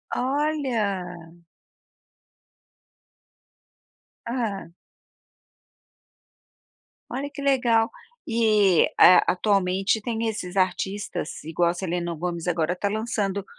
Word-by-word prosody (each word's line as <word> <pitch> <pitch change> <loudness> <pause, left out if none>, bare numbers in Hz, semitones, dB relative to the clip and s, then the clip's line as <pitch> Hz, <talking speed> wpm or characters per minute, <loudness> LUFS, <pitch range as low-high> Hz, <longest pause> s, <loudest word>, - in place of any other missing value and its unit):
Olha! 225 - -2 2.9
Hã. 225 -7 -3 2.4
Olha 275 +3 -4
que 280 0 -9
legal. 245 -5 +2 0.4
E, 215 -6 +3 0.2
eh, 180 - +8
atualmente 195 +1 +1
tem 230 0 -2
esses 195 -4 -4
artistas, 190 -1 -2
igual 165 +2 +1
a - - 0
Selena 175 -1 -3
Gomez, 170 +1 -4
agora 175 0 0
tá 200 +2 -2
lançando 205 -3 -2
200 Hz, 80 wpm, -24 LUFS, 180-230 Hz, 2.9 s, eh